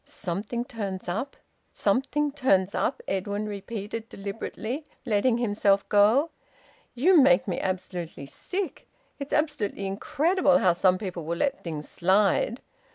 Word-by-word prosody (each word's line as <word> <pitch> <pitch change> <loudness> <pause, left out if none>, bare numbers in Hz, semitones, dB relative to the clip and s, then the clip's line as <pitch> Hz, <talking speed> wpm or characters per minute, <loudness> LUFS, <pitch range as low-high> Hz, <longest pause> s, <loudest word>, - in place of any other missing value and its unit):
"`Something 210 +6 -4
turns 200 -7 -5
up,' 225 +11 -3 0.4
`something 275 +7 +1
turns 200 -9 +2
up!'" 260 - -1
Edwin 200 +2 -2
repeated 210 +2 -6
deliberately, 220 +7 -5 0.2
letting 230 +1 +2
himself 205 -4 +2
go. 220 +10 +4 0.6
"You 325 +6 +6
make 265 -2 +4
me 185 - -1
absolutely 180 -5 -4
sick! 370 - -5 0.3
It's 280 0 -6
absolutely 290 -10 -1
incredible 290 - +2
how 185 -8 +4
some 180 +1 +3
people 185 -4 -5
will 170 +2 -3
let 280 +7 -1
things 155 -3 -5
slide! 195 +6 +2
210 Hz, 125 wpm, -26 LUFS, 190-265 Hz, 0.6 s, You